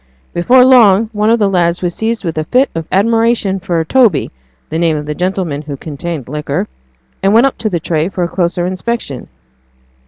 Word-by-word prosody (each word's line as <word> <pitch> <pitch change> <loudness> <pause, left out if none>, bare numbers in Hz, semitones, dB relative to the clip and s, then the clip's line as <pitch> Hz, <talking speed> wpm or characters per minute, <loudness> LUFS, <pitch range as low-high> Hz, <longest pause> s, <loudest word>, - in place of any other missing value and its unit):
Before 250 +9 +4
long 225 -4 +5
one 210 +1 +1
of 230 - +4
the 210 -3 +2
lads 175 -2 0
was 175 -1 -1
seized 225 0 -3
with 165 - -3
a 155 - -3
fit 255 - +2
of 165 -1 -5
admiration 225 -1 +1
for 170 -2 -2
Toby 230 - +2 0.4
the 160 - -2
name 165 -2 +1
of 150 - -5
the 150 - -4
old 150 - -7
gentleman 180 -5 -2
who 145 -2 -7
contained 155 -1 -6
liquor 150 +3 -3 0.5
and 195 +2 +2
went 235 +4 +6
up 275 - -1
to 220 - -1
the 175 -4 -1
tray 160 +1 -1
for 180 -1 -3
a - - 0
closer 175 0 -1
inspection. 185 - -4
180 Hz, 205 wpm, -14 LUFS, 165-225 Hz, 0.5 s, went